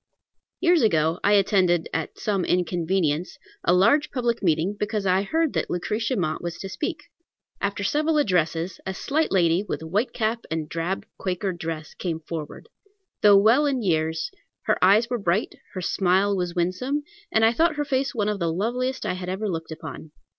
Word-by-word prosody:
] - - -58
Years 345 -3 +4
ago 160 -5 +2
I 205 - +4
attended, 185 -4 +3
at 160 - -3
some 200 -5 -1
inconvenience, 175 -1 0 0.3
a - - +3
large 230 +12 +4
public 240 -3 -1
meeting, 170 +2 +1
because 210 -1 -2
I 185 0 +3
heard 320 +9 0
that - - -1
Lucretia 220 +7 -1
Mott 160 -7 -1
was 170 -1 -5
to 195 - -6
speak. 300 - -4 0.6
After 200 0 -1
several 305 +8 +1
addresses, 170 - 0
a 190 - -3
slight 310 +9 0
lady, 175 -2 +3
with 210 - -4
white 200 +10 0
cap 225 +1 -1
and 160 -1 -2
drab 170 +4 -3
Quaker 185 +1 -2
dress, 160 -2 -6
came 165 -3 -3
forward. 160 - -7 0.5
Though 205 -1 +7
well 230 +9 +5
in 265 -4 0
years, 160 -3 0 0.3
her - - +1
eyes 205 +5 +5
were 245 -1 -2
bright; 195 +2 0 0.2
her 185 - -3
smile 190 +3 +2
was 180 -2 -2
winsome, 185 +12 -1 0.3
and 220 0 +4
I 225 - +4
thought 325 +5 +2
her 295 0 -1
face 270 -1 -1
one 210 -3 0
of 210 -1 -1
the 170 -2 0
loveliest 250 +8 -2
I - - 0
had 180 0 -5
ever 195 +3 -2
looked 165 -4 -4
upon. 155 -1 -8
195 Hz, 180 wpm, -24 LUFS, 170-230 Hz, 0.6 s, Though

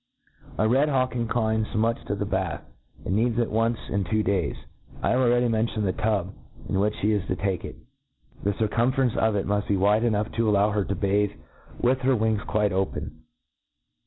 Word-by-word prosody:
A - - +2
young 110 - +2
red 140 +4 +3
hawlc 130 -2 +1
inclines 110 -2 -1
much 115 +2 +1
to - - -2
the - - -2
batfi^ - - -2 0.4
and 95 - 0
needs 115 +2 +1
it 120 -1 0
once 115 +1 +1
in 100 -1 -1
two 110 +5 0
days. 95 -6 0 0.5
I - - +2
have 125 - +2
already 120 -1 +3
mentioned 110 -2 0
the 95 - 0
tub 100 -4 -1 0.3
in 95 - 0
which 105 +1 +1
flie 105 - +2
is 105 -3 -1
to 95 - -1
take 95 0 -2
it. - - -7 0.7
The 100 - 0
circumference 120 +3 +1
of 110 -1 +2
it 100 - 0
muft 105 +1 -1
be 100 - +1
wide 105 +4 +3
enough 105 -2 0
to 115 -1 +1
allow 105 +1 +3
her 105 -1 0
to 100 - -2
bathe 100 +2 0 0.4
with 130 +2 +2
her 130 0 +2
wings 110 -2 +1
quite 105 0 +1
open. 95 0 -3
110 Hz, 200 wpm, -25 LUFS, 100-115 Hz, 0.7 s, red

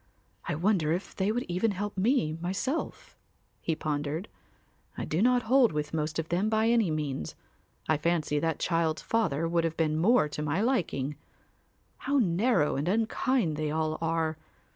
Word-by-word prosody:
I - - -1
wonder 170 -2 +1
if 180 +4 -3
they 195 +2 +1
would 245 +3 -1
even 180 +6 +1
help 205 +2 -4
me 195 - +2
myself," 195 - -3 0.5
he 165 - -1
pondered. 150 +4 -3 0.7
"I - - -3
do 160 - -1
not 245 +1 +3
hold 250 +1 +4
with 150 0 -3
most 155 0 -2
of 165 0 -3
them 185 +5 +1
by 220 +1 +2
any 230 -6 +3
means. 145 - -3 0.5
I 155 - +3
fancy 155 -2 0
that 165 +1 0
child's 165 -2 0
father 165 -9 0
would 170 0 +1
have 165 -1 -2
been 155 -1 +1
more 205 -1 +4
to 150 0 -5
my 150 +3 0
liking. 165 - 0 0.8
How 280 +2 0
narrow 190 - +2
and 145 +4 -2
unkind 220 - +1
they 155 -1 -1
all 155 0 -1
are. 160 -1 -1
170 Hz, 165 wpm, -29 LUFS, 155-220 Hz, 0.8 s, hold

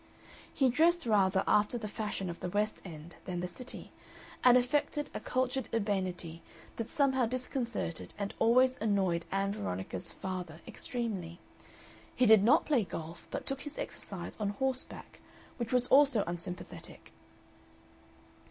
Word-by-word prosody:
He 265 -2 +3
dressed 330 +6 +3
rather 195 -4 +3
after 210 +3 +3
the 220 -2 -4
fashion 210 -2 -3
of 170 - -9
the 180 - -3
West 210 +3 0
End 165 -2 -10
than 180 -2 -3
the 180 - -2
City, 255 +7 -7 0.5
and 250 0 +8
affected 290 +3 0
a - - -3
cultured 255 -1 -1
urbanity 185 -6 -2 0.4
that 230 0 -3
somehow 265 -4 +3
disconcerted 245 - -3
and 200 -1 -3
always 255 +2 +4
annoyed 190 -6 +1
Ann 195 +1 +1
Veronica's 95 - -4
father 180 -4 -5
extremely. 195 -9 -4 0.8
He 255 - +4
did 220 -3 +7
not 235 +6 +5
play 280 -7 +3
golf, 165 -2 -7
but - - -4
took 270 0 -2
his 295 0 -7
exercise 185 0 -5
on 210 -2 0
horseback, 260 +5 -2 0.4
which 235 -2 -3
was 250 -1 +3
also 270 -6 +6
unsympathetic. 175 +1 -6
210 Hz, 140 wpm, -32 LUFS, 180-255 Hz, 0.8 s, and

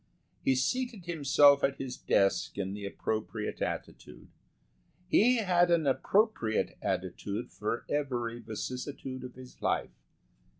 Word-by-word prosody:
He 130 - +3
seated 230 - -1
himself 145 -3 +5
at 135 0 +1
his 130 -2 -5
desk 100 0 +1
in 95 -1 -2
the 100 -1 -5
appropriate 110 +2 -3
attitude. - - -5 0.8
He 245 +6 +5
had 180 -5 +3
an 170 -3 +3
appropriate 140 - +1
attitude 100 +5 -3
for 110 +3 -3
every 120 -5 -2
vicissitude 130 +4 -5
of 125 -1 -8
his 130 0 -13
life. - - 0
130 Hz, 120 wpm, -30 LUFS, 115-170 Hz, 0.8 s, himself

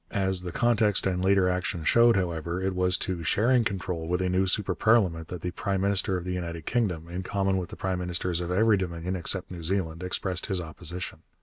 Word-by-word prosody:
As 95 -3 0
the 90 -1 -5
context 110 -1 +2
and 90 -1 0
later 95 -1 +4
action 90 -2 -1
showed, 115 +6 +5
however, 85 -2 -1
it 95 0 -1
was 90 0 +2
to 90 -3 -3
sharing 120 +9 +3
control 90 -5 -3
with 90 +1 0
a 95 0 0
new 95 +1 +2
super 95 0 0
parliament 90 -8 +2
that 90 -2 -7
the 90 - -3
prime 95 +1 -2
minister 100 -1 +1
of 90 - -5
the 90 0 -3
United 85 -3 -5
Kingdom, 90 -9 -1
in 90 +2 -4
common 95 0 0
with 90 -2 -3
the - - -8
prime 95 -1 -2
ministers 90 -1 -2
of 85 - -4
every 105 +3 +4
Dominion 90 0 -3
except 95 +1 -2
New 90 -2 -7
Zealand, 85 -1 -2
expressed 90 0 -1
his 95 -3 0
opposition. 85 +2 -5
90 Hz, 215 wpm, -27 LUFS, 85-95 Hz, -, showed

